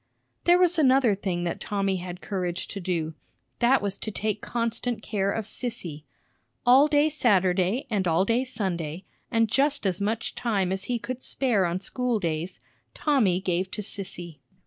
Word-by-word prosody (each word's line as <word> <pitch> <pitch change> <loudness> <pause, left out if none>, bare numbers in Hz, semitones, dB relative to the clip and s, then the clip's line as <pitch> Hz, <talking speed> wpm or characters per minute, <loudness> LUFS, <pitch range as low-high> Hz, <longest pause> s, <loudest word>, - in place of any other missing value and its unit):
There 350 +1 +6
was 360 -2 +3
another 260 -5 +5
thing 190 -3 -2
that 170 - -2
Tommy 195 -2 -1
had 180 0 -7
courage 180 -3 -3
to 200 - -5
do; 170 -4 -2 0.5
that 250 -1 +4
was 200 -1 -1
to - - -4
take 215 0 -2
constant 235 -1 -2
care 200 -2 0
of 220 0 -2
Sissy. 190 - -5 0.6
All 260 +4 +7
day 295 0 +4
Saturday 195 - +2
and 200 -5 0
all 170 +3 +3
day 235 +4 +2
Sunday, 185 - -3 0.2
and 225 -2 +3
just 280 +3 +1
as 190 -1 0
much 220 +2 -1
time 200 -6 0
as 190 0 -3
he 245 - 0
could 255 +2 -5
spare 230 -11 +1
on 170 +2 -2
school 245 +3 -1
days, 170 0 -3 0.4
Tommy 230 - +2
gave 185 0 -1
to 210 - -4
Sissy. 175 -6 -6
200 Hz, 170 wpm, -26 LUFS, 180-245 Hz, 0.6 s, All